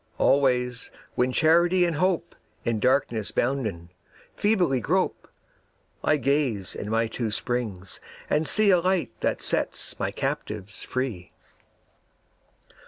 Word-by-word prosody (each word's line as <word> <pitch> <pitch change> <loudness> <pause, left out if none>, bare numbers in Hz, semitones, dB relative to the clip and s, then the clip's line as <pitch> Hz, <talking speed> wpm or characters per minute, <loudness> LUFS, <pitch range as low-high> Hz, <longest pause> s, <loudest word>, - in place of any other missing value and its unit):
Always 125 -3 +2 0.2
when 125 +1 +1
Charity 170 +5 +4
and 170 -4 -1
Hope, 175 0 0 0.3
In 115 -2 0
darkness 120 -3 +1
bounden, 110 -10 -1 0.4
feebly 185 - +2
grope, 110 - 0 0.8
I 155 - +3
gaze 135 -8 0
in 105 - -5
my 115 +1 +2
two 115 0 -3
springs 105 -4 -3 0.3
and 155 +1 +1
see 215 -2 +5
A 180 - +5
Light 185 0 0
that - - -1
sets - - -2
my - - 0
captives 105 -1 -4
free. 125 -9 -3
130 Hz, 115 wpm, -26 LUFS, 110-165 Hz, 0.8 s, see